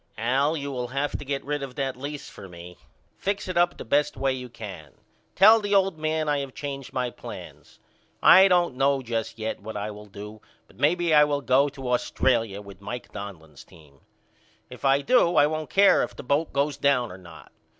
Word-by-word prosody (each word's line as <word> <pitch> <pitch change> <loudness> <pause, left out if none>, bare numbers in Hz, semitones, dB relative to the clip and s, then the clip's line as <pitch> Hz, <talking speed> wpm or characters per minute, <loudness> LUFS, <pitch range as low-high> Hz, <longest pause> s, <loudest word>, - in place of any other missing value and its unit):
Al 135 +7 +1
you 140 -1 -5
will 125 -2 -3
have 140 +3 -2
to - - -7
get 140 0 -4
rid 145 0 -2
of 135 -2 -7
that 135 -2 -2
lease 145 +3 -7
for 95 - -12
me. 90 0 -11 0.4
Fix 200 0 -2
it 185 - -4
up 175 0 +2
the - - -8
best 145 +5 +1
way 135 0 0
you 125 -1 -7
can. 95 - -10 0.4
Tell 215 +4 +7
the 205 -1 -1
old 190 -4 +2
man 155 0 -1
I 145 -1 +1
have 135 -2 -6
changed 140 -2 -6
my 125 -2 -2
plans. - - -11 0.4
I 190 +2 +8
don't 175 -5 +2
know 135 0 +2
just 115 -1 -3
yet 110 -1 -4
what 110 +1 -7
I 105 +1 -4
will 105 0 -11
do 105 +2 -10 0.2
but - - -23
maybe 165 +3 +2
I 150 -1 +7
will 145 -1 -1
go 135 +2 +3
to 135 -2 -7
Australia 115 -4 0
with 100 -1 -13
Mike 120 +5 -7
Donlin's 85 -8 -9
team. 75 -4 -20 0.7
If - - -11
I 135 +1 +3
do 180 - +3
I 145 - +6
won't 155 0 -3
care 200 +1 +5
if - - -4
the - - -9
boat 145 +5 0
goes 140 +1 0
down 125 -5 +1
or 90 - -10
not. 85 -3 -14
135 Hz, 210 wpm, -25 LUFS, 110-150 Hz, 0.7 s, I